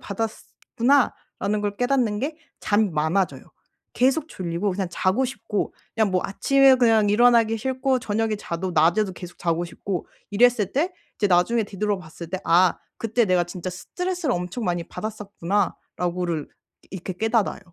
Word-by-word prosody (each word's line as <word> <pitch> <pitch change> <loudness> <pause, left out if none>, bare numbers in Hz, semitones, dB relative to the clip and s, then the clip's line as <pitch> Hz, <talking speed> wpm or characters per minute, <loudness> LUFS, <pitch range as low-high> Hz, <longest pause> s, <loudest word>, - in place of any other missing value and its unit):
받았었구나.'라는 225 +1 -1
걸 205 0 -2
깨닫는 245 -5 +1
게 305 +4 -3 0.2
잠이 210 0 +2
많아져요. 160 +5 0 0.5
계속 270 +5 +2
졸리고 180 +2 -2
그냥 190 +1 -2
자고 190 +9 +1
싶고 240 -5 -3 0.2
그냥 220 -3 +2
뭐 185 - +2
아침에 270 +6 +4
그냥 225 -4 +4
일어나기 230 0 +4
싫고 260 +2 0
저녁에 220 -1 -1
자도 185 -1 -4
낮에도 175 +5 +3
계속 180 -1 -10
자고 170 0 0
싶고 180 +2 -5 0.2
이랬을 215 -2 +3
때 335 +7 0 0.2
이제 205 - +1
나중에 195 +6 +3
뒤돌아 205 0 -2
봤을 170 -1 -10
때 190 - -2
'아 175 +1 +4 0.2
그때 225 +1 +1
내가 180 -2 +3
진짜 180 +1 -6
스트레스를 355 - -3
엄청 180 +7 -4
많이 175 -2 -1
받았었구나.'라고를 180 -5 -3 0.4
이렇게 185 0 -5
깨달아요. 220 +2 0
205 Hz, 350 characters per minute, -24 LUFS, 180-240 Hz, 0.5 s, 아침에